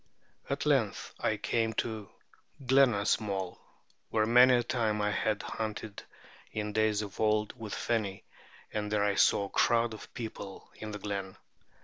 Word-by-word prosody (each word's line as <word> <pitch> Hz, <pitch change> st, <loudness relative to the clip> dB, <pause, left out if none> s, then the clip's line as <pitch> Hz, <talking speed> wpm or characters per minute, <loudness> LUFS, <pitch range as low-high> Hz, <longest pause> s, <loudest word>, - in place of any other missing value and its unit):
At -, -, -1 dB
length -, -, +1 dB
I -, -, 0 dB
came 115 Hz, -1 st, 0 dB
to 110 Hz, -2 st, -3 dB, 0.6 s
Glenasmole,[B] 105 Hz, -7 st, +2 dB, 0.5 s
where 110 Hz, -1 st, +2 dB
many 125 Hz, +3 st, +7 dB
a 120 Hz, -, +2 dB
time 115 Hz, -3 st, 0 dB
I 105 Hz, 0 st, +1 dB
had 105 Hz, 0 st, 0 dB
hunted 110 Hz, -1 st, -5 dB, 0.5 s
in 105 Hz, -1 st, -3 dB
days 110 Hz, -1 st, +2 dB
of 100 Hz, -2 st, -9 dB
old 105 Hz, -1 st, +2 dB
with 110 Hz, -4 st, -7 dB
the -, -, -3 dB, 0.2 s
Feni, 100 Hz, -4 st, -2 dB, 0.5 s
and 105 Hz, -1 st, -2 dB
there 105 Hz, -1 st, +2 dB
I 100 Hz, -1 st, +2 dB
saw 100 Hz, -, +4 dB
a -, -, -8 dB
crowd 115 Hz, +2 st, +2 dB
of 110 Hz, -, -10 dB
people 110 Hz, -4 st, -7 dB
in 110 Hz, -, -7 dB
the 105 Hz, -, -5 dB
glen. 100 Hz, -2 st, -4 dB
105 Hz, 155 wpm, -31 LUFS, 100-115 Hz, 0.6 s, many